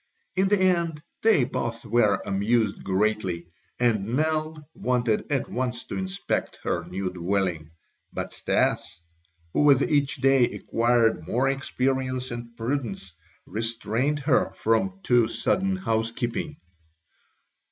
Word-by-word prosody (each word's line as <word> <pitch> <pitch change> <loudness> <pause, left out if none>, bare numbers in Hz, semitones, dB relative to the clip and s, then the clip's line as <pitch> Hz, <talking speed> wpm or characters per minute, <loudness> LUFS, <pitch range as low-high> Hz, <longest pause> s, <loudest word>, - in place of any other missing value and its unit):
In 190 +1 +3
the 205 0 +3
end 170 -5 +1 0.2
they 220 - +5
both 115 -1 -3
were 105 -3 +2
amused 105 +2 +1
greatly 95 -3 0 0.3
and 115 -2 +1
Nell 155 0 -1
wanted 125 -2 0
at 135 -3 0
once 125 -1 -2
to - - -6
inspect 190 +1 -2
her - - -1
new 95 0 -3
dwelling, 90 -3 -1 0.4
but - - -4
Stas, - - 0 0.5
who - - +2
with 140 -2 +6
each 145 -4 +1
day 135 -2 +4
acquired 115 -6 +1
more 125 +7 +1
experience 130 -1 -1
and 120 -1 -7
prudence, 115 - -3 0.3
restrained 115 +6 -1
her 135 -1 +2
from 190 - 0
too 120 -7 +4
sudden 190 +9 0
housekeeping. 120 0 -2
120 Hz, 120 wpm, -26 LUFS, 110-145 Hz, 0.5 s, with